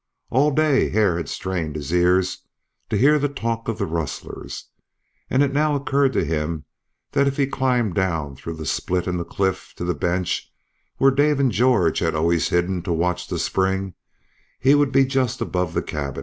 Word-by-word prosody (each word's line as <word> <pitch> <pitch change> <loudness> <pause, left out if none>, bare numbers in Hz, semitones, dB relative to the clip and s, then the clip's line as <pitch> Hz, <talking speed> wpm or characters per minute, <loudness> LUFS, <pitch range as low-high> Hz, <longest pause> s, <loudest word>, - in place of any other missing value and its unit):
All 140 +5 +4
day 150 -1 +2
Hare 105 -6 +2
had 85 -4 -4
strained 85 -5 -3
his 75 +1 -4
ears 90 +1 +2 0.5
to - - 0
hear 150 +4 +5
the 145 0 0
talk 115 -4 -3
of 115 -2 -2
the 100 - -1
rustlers, 80 -3 -5 0.6
and 135 +2 +3
it 140 -1 0
now 150 +1 +2
occurred 140 -1 +1
to - - +1
him 75 -1 -2 0.5
that 140 - +2
if 140 - -1
he 140 - +3
climbed 125 -6 0
down 80 -7 -1
through 80 +5 -7
the 80 -1 -7
split 90 +5 -1
in 90 -1 -1
the 85 - -2
cliff 95 +1 -2
to - - -4
the 90 - 0
bench 90 +1 -2 0.5
where 135 0 +5
Dave 145 +1 +2
and 135 -3 +3
George 110 -8 +3
had - - 0
always 80 -1 +1
hidden 90 +1 0
to 90 - -4
watch 90 +2 -1
the - - -3
spring 95 0 0 0.7
he 135 +3 +5
would 145 -2 +3
be 135 0 +4
just 130 -2 0
above 90 -2 -2
the - - 0
camp. 70 -3 -4
95 Hz, 190 wpm, -22 LUFS, 85-135 Hz, 0.7 s, hear